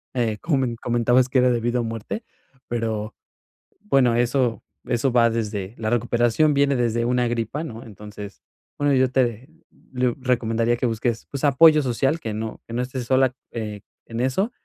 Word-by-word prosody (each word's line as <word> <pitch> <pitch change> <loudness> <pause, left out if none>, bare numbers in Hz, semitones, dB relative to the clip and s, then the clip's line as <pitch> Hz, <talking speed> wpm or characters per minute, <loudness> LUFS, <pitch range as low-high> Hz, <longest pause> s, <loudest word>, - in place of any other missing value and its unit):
Eh, 115 -4 0
como 155 -3 +1
me 130 - +1
en 120 - -4
comentabas 120 +2 +2
que 130 - +3
era 125 0 +4
de 120 - +1
vida 120 +1 0
o - - -2
muerte, 115 - -5 0.4
pero, 110 -2 -3 0.7
bueno, 135 - +3
eso 120 0 +1 0.2
eso 120 +1 0
va 120 -1 +5
desde 105 -3 -3
la 110 -1 -2
recuperación, 120 +5 +2
viene 140 0 +2
desde 120 -1 0
una 125 0 +1
gripa, 120 +6 -2
¿no? 115 -7 -8
Entonces, 105 -1 -10 0.4
bueno, 145 -1 +2
yo 130 -1 +3
te 125 +1 0 0.4
le- 125 -1 +1
recomendaría 120 -2 +1
que 125 - -1
busques, 115 +1 -2
pues, 140 - -5
apoyo 155 +2 +6
social, 135 +4 0
que 110 -7 -4
no 110 +1 -5
que 115 - -8
no 120 - 0
estés 125 0 -4
sola, 130 +1 +3 0.2
eh, 105 -3 -5 0.3
en 115 0 -5
eso 130 - 0
120 Hz, 180 wpm, -23 LUFS, 115-130 Hz, 0.7 s, apoyo